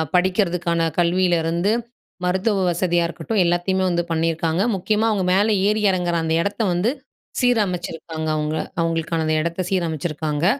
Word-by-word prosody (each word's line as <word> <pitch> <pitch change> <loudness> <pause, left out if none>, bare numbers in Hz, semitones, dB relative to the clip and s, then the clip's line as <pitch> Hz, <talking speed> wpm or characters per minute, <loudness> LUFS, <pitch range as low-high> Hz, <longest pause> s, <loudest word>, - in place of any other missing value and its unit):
படிக்குறதுக்கான 180 -2 +1 0.2
கல்வியிலிருந்து, 175 +1 +2 0.5
மருத்துவ 190 +2 +1
வசதியா 175 0 +1
இருக்கட்டும். 175 +5 -2
எல்லாத்தையுமே 175 +2 +1
வந்து 175 -1 0
பண்ணியிருக்காங்க, 165 +2 0
முக்கியமா 210 +4 0
அவங்க 200 -3 0
மேல 205 +3 +3
ஏறி 210 +1 +1
இறங்குற 180 -2 0
அந்த 160 - 0
இடத்த 205 +4 -2
வந்து 190 +7 +1 0.5
சீரமைச்சிருக்காங்க 180 -9 -1
அவங்க. 150 +1 -1 0.2
அவங்களுக்கான 165 0 0
அந்த 155 0 +1
இடத்த 170 +3 -2
சீரமைச்சிருக்காங்க. 160 -3 -1
175 Hz, 125 wpm, -21 LUFS, 165-190 Hz, 0.5 s, மேல